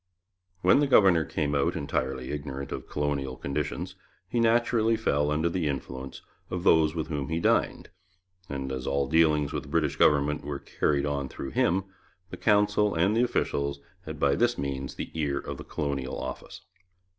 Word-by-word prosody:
When - - +6
the 145 - +2
governor 95 -10 +5
came 80 -3 -2
out 70 -1 +1
entirely 65 -2 -2
ignorant 70 -2 -5
of - - -6
colonial 70 -3 -2
conditions 75 +6 -3 0.3
he 120 - -1
naturally 115 -1 +3
fell 75 -10 +1
under 75 +3 +1
the 85 -2 -1
influence 65 -1 -5 0.3
of 90 -1 -3
those 80 -3 +4
with 80 -2 -2
whom 75 -3 -3
he 80 0 -1
dined, - - +1 0.6
and 65 -1 -4
as 65 0 -4
all 70 0 +1
dealings 75 -1 +3
with - - -2
the - - -13
British 75 -2 0
government 75 0 +3
were 70 -1 -4
carried 70 0 0
on 70 -2 -2
through 70 - -6
him, 95 +2 +2 0.5
the - - -6
Council 105 -1 +3
and 90 +6 +2
the 115 - +3
officials 70 - 0 0.3
had - - -6
by 70 - +3
this 120 +7 +2
means 70 -1 -4
the - - -6
ear 75 -3 -1
of - - -5
the - - -8
Colonial 70 -3 -3
Office. 65 0 -7
75 Hz, 175 wpm, -27 LUFS, 70-85 Hz, 0.6 s, When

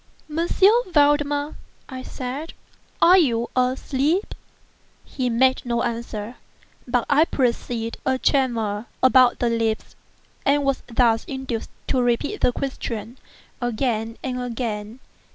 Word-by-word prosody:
"M. 325 +3 -1 0.4
Valdemar," 290 -2 +2 0.3
I 260 -2 -7
said, 260 +5 -6 0.5
"are 365 +2 +8
you 235 -7 +1
asleep?" 270 - 0 0.7
He 255 -3 -2
made 260 +3 +3
no 235 -1 -1
answer, 230 -1 -4 0.5
but 245 -1 +1
I 295 +3 +4
perceived 235 -4 -1
a 260 0 +1
tremor 235 -6 0 0.2
about 255 -1 +6
the 240 - +1
lips, 225 -1 -1 0.5
and 285 +1 +2
was 275 -1 0
thus 230 -1 +2
induced 265 -4 -4 0.2
to 260 - +2
repeat 245 - 0
the - - +4
question, 245 -2 -5 0.4
again 230 -2 -1
and 250 -1 -3
again. 230 -1 -4
250 Hz, 115 wpm, -23 LUFS, 230-275 Hz, 0.7 s, are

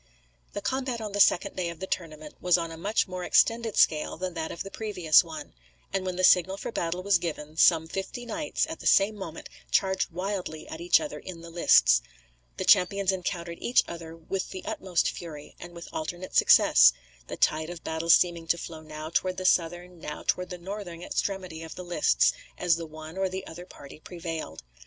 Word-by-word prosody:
The - - -4
combat 260 -2 -2
on 215 -2 -5
the 205 - -3
second 185 - +4
day 180 -2 -2
of 170 -1 -9
the 190 - -4
tournament 155 -5 -5
was 180 0 +4
on 165 -1 -4
a - - -7
much 200 +7 0
more 185 -1 -5
extended 230 +3 +2
scale 155 -1 +3
than 185 +1 -4
that 160 -1 -4
of - - -5
the 195 - -9
previous 185 -8 +3
one; - - -9 0.4
and 195 - 0
when 185 -1 -3
the 185 - -2
signal 185 +1 +5
for 205 - -5
battle 175 -2 -2
was 195 -2 +3
given 155 -2 -5
some 160 0 +4
fifty 195 +8 -5
knights, 300 +5 -1
at 320 0 -7
the - - -3
same 200 +2 +5
moment, 170 -5 -8 0.2
charged 190 -1 +1
wildly 180 -3 -4
at 160 - -7
each 175 - +5
other 305 - -6
in 175 -3 -9
the 170 0 -10
lists. 60 - +5 0.6
The - - -3
champions 195 +1 +4
encountered 175 -2 -4
each 245 - +3
other 165 -1 -8
with 185 +3 -4
the 185 - -8
utmost 180 -3 0
fury, 155 -4 -9
and 175 0 -10
with 170 - -9
alternate 175 +4 -5
success; - - +7 0.3
the - - -6
tide 155 +1 +1
of 175 -2 -8
battle 160 +1 -4
seeming 170 -1 +4
to 170 - +2
flow 160 -1 -8
now 155 0 -8
toward 185 -1 0
the 185 - -4
southern, 175 0 +1
now 150 -1 -7
toward 180 0 0
the 180 - -6
northern 175 -2 -7
extremity 185 -5 -3
of 160 -1 -8
the 180 - -7
lists 175 +11 +3 0.2
as 175 -2 +3
the 165 -1 -6
one 155 +3 -9
or 190 -1 +1
the 190 +1 -5
other 175 +2 -10
party 140 -3 -13
prevailed. 165 - -7
175 Hz, 205 wpm, -27 LUFS, 165-190 Hz, 0.6 s, success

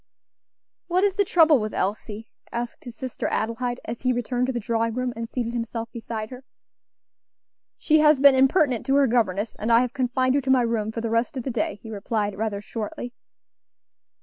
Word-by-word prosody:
"What 360 +2 +1
is 405 -1 +3
the 405 +1 +2
trouble 325 -6 +5
with 215 -1 -4
Elsie?" 210 +2 -3 0.2
asked 235 +2 -5
his 240 -2 -8
sister 255 +1 -4
Adelaide, 240 +2 -2
as 230 +1 -6
he 255 - +2
returned 245 +1 -1
to - - 0
the 240 - -2
drawing 230 0 -1
room 255 -1 -2
and 230 0 -5
seated 235 -2 -3
himself 230 -1 -4
beside 225 -1 -6
her. 255 +1 -9 1.3
"She 310 0 +3
has 300 -2 +5
been 280 0 +7
impertinent 265 - +3
to 270 - +3
her 280 0 +5
governess, 220 -4 0
and 220 +2 -1
I 230 +1 +6
have 250 -1 -2
confined 255 0 +1
her 285 - +2
to 265 - -5
my 260 -2 +5
room 225 -2 -1
for 230 - -4
the 230 -1 -3
rest 230 +4 0
of 255 - -3
the 265 - -3
day," 230 -3 -1
he 225 - -8
replied, 205 0 -2
rather 205 -1 -3
shortly. 230 +3 -6
240 Hz, 200 wpm, -24 LUFS, 225-260 Hz, 1.3 s, been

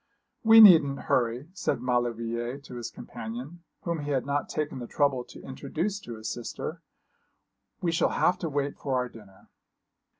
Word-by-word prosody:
'We 225 0 +9
needn't 155 -9 +8
hurry,' 125 +4 0
said 190 - -1
Maulevrier 120 0 -1
to 140 -3 -11
his 120 -2 -5
companion, 125 +10 -8 0.2
whom 170 -2 -2
he 145 0 -5
had 135 -3 0
not 140 +1 -1
taken 150 -3 -3
the 120 - -6
trouble 140 -2 +1
to - - -13
introduce 160 +9 -3
to 120 - -8
his 110 - -7
sister. 155 +7 -5 1.0
'We 170 - +2
shall 165 - +2
have 180 +1 +2
to 165 - -3
wait 140 -1 -2
for 135 -2 -2
our 125 -1 0
dinner.' 100 -4 -16
140 Hz, 165 wpm, -28 LUFS, 120-160 Hz, 1.0 s, We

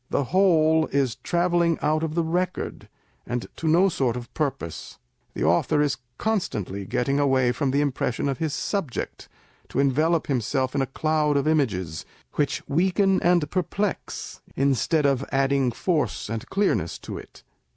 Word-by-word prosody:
The - - +1
whole 160 -4 +4
is 135 -4 0
travelling 170 +1 +1
out 155 +1 +2
of 160 -1 -2
the 170 - +2
record, 180 +3 -2 0.4
and 120 -1 -2
to 165 - -3
no 175 +5 +5
sort 130 -9 0
of 120 -1 -9
purpose. 130 - -4 0.4
The - - -2
author 150 - +2
is 145 -1 +1 0.2
constantly 105 - -2
getting 135 +7 0
away 130 -3 +3
from 135 +2 -1
the 140 +2 +2
impression 140 -2 -1
of 135 -3 -2
his 160 -2 -1
subject, 165 - -3 0.4
to - - -2
envelope 155 +5 +2
him 130 -4 0
self 130 +3 -1
in 140 - +1
a 135 - 0
cloud 150 +1 +1
of 140 - 0
images, 95 - 0 0.3
which 145 -2 -1
weaken 190 +5 +2
and 175 -3 +3
perplex, 195 +2 -3
instead 140 +3 +2
of 140 -1 +2
adding 135 -1 +2
force 150 - -1
and 115 0 -5
clearness 195 - 0
to - - -7
it. - - -15
145 Hz, 160 wpm, -25 LUFS, 130-165 Hz, 0.4 s, no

